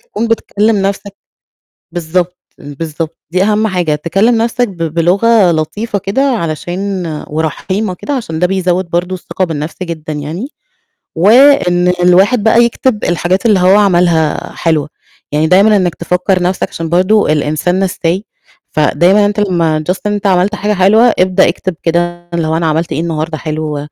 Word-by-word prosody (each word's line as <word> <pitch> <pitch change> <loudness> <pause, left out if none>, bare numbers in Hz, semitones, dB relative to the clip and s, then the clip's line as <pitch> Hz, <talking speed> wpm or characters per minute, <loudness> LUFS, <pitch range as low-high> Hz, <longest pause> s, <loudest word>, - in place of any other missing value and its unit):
تكون 225 +2 -4
بتكلّم 220 -1 0
نَفْسك 200 0 -3 0.8
بالضبط، 175 +1 -2 0.2
بالضبط، 155 +2 -6
دي 185 +2 +1
أهَم 215 +1 +1
حاجة 180 -6 0
تكلّم 195 +10 +1
نَفْسك 240 +1 0
ب 190 - -11 0.2
بلغة 190 +4 +3
لطيفة 200 +7 -2
كده 200 +7 -1
علشان 190 - -2 0.2
ورحيمة 180 +6 -2
كده 290 - -6
عشان 165 -12 -4
ده 180 - +2
بيزوّد 185 -1 -1
برضه 175 +2 -1
الثقة 185 +1 -3
بالنَفْس 155 -2 -5
جدًا 165 -3 -5
يعني، 155 - -5 0.7
وإن 195 - +4 0.2
الواحد 195 +6 +4
بقى 230 +2 +4
يكتب 235 -1 -1
الحاجات 175 +4 0
اللي 210 -4 +4
هو 185 +2 +4
عملها 175 -6 +1
حلوة، 160 -3 0 0.4
يعني 150 +2 +1
دايمًا 200 +5 +4
إنّك 180 -4 0
تفكّر 180 +2 -1
نَفْسك 180 +1 -1
عشان 165 -1 -5
برضه 185 +1 +2
الإنسان 155 +4 0
نسّاي، 185 +1 -2 0.5
فدايمًا 175 +7 +3
أنت 205 +1 -1
لمّا 170 -6 0
Just 190 - -3
إن 210 - 0
أنت 205 0 -1
عملت 190 +3 +2
حاجة 210 +1 -1
حلوة 215 +5 +4
ابدأ 185 0 +3
اكتب 185 +1 -3
كده 175 +1 -1
اللي 165 -2 -1
هو 160 - 0
أنا 165 - -1
عملت 160 +2 -1
إيه - - -2
النهارده 160 -1 -3
حلو، 155 -1 -4
180 Hz, 155 wpm, -13 LUFS, 165-205 Hz, 0.8 s, وإن